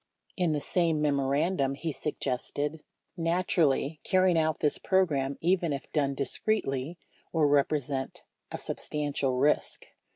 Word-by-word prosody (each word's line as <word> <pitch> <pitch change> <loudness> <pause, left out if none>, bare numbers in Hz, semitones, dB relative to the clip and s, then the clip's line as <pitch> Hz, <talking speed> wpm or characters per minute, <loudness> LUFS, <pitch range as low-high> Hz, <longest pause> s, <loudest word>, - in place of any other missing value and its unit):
In 180 -4 +1
the 150 - -1
same 165 -2 +1
memorandum, 140 +1 +1
he 160 +3 -3
suggested: 145 +2 -2 0.3
Naturally, 165 -4 +1
carrying 185 -2 +3
out 160 -1 +1
this 150 - +1
program, 145 -8 +1
even 175 -1 +2
if 140 -1 -5
done 140 -3 0
dis 140 0 -2
cretely, 160 -7 -1 0.3
will 160 -3 +2
represent 140 -2 0 0.3
a - - -3
substantial 145 -3 -2
risk. 145 +3 +1
150 Hz, 125 wpm, -29 LUFS, 140-170 Hz, 0.3 s, carrying